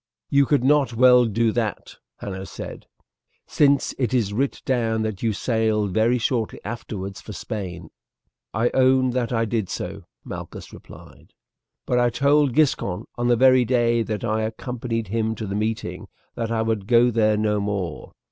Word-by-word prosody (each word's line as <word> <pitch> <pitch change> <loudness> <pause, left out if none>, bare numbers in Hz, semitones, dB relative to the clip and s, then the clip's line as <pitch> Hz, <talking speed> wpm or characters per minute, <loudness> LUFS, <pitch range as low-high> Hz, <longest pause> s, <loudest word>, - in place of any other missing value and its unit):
"You 140 -1 +4
could 145 -4 +2
not 135 -3 +3
well 125 0 +6
do 115 +1 +1
that," 110 -2 -3 0.2
Hanno 95 -1 -6
said, - - -9 0.6
"since 140 -2 +2
it 125 -1 0
is 105 -5 0
writ 135 +6 -2
down 115 -4 0
that 110 -3 -4
you 115 - +1
sailed 110 -3 0
very 115 +4 +3
shortly 115 -2 -1
afterwards 100 -3 -6
for 105 - -9
Spain." 90 -6 -6 0.6
"I 115 +3 0
own 130 0 +3
that 125 -1 -1
I 115 -1 +1
did 110 -3 -2
so," - - -5 0.2
Malchus - - -8
replied, - - -15 0.5
"but 125 - +1
I 120 0 +3
told 140 +1 +2
Giscon 110 -10 +1
on 120 0 -1
the 120 - +4
very 130 +1 +5
day 120 -1 +2
that 110 -3 -3
I 110 -1 0
accompanied 115 -1 -4
him 110 +1 -1
to 110 - -5
the 100 - -4
meeting 110 +2 -3 0.3
that 115 -1 -3
I 115 -1 0
would 110 -3 -2
go 120 0 +5
there 110 -2 +2
no 105 -1 +1
more. 100 -5 -4
115 Hz, 165 wpm, -23 LUFS, 105-125 Hz, 0.6 s, well